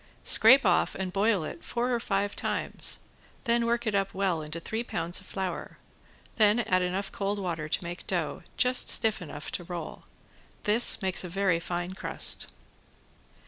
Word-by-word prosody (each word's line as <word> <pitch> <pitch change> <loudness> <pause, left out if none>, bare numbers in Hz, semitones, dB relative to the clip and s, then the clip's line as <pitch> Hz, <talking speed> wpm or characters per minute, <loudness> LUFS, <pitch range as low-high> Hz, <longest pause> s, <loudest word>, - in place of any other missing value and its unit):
Scrape 255 +3 +7
off 180 - +2
and 185 -1 -4
boil 200 -3 +1
it 165 +2 -8
four 245 +1 -2
or 240 - 0
five 200 -2 -2
times; - - 0 0.4
then 235 0 +1
work 235 0 -1
it 215 - -1
up 195 -1 -1
well 190 -4 0
into 155 +2 -7
three 220 +7 -4
pounds 175 -4 -3
of 190 - -17
flour, 190 -3 -5 0.6
then 215 +1 +4
add 185 -5 +1
enough 185 +2 -3
cold 200 +1 -3
water 165 -5 -4
to - - -2
make 175 +1 -8
dough, 175 -5 -2 0.2
just 250 0 +3
stiff 220 -3 +3
enough 145 -3 -8
to 175 - -4
roll. 170 -2 -7 0.6
This 215 0 +5
makes 190 0 0
a 180 - -6
very 185 -1 0
fine 175 +1 -4
crust. 190 - 0
190 Hz, 170 wpm, -27 LUFS, 175-215 Hz, 0.6 s, Scrape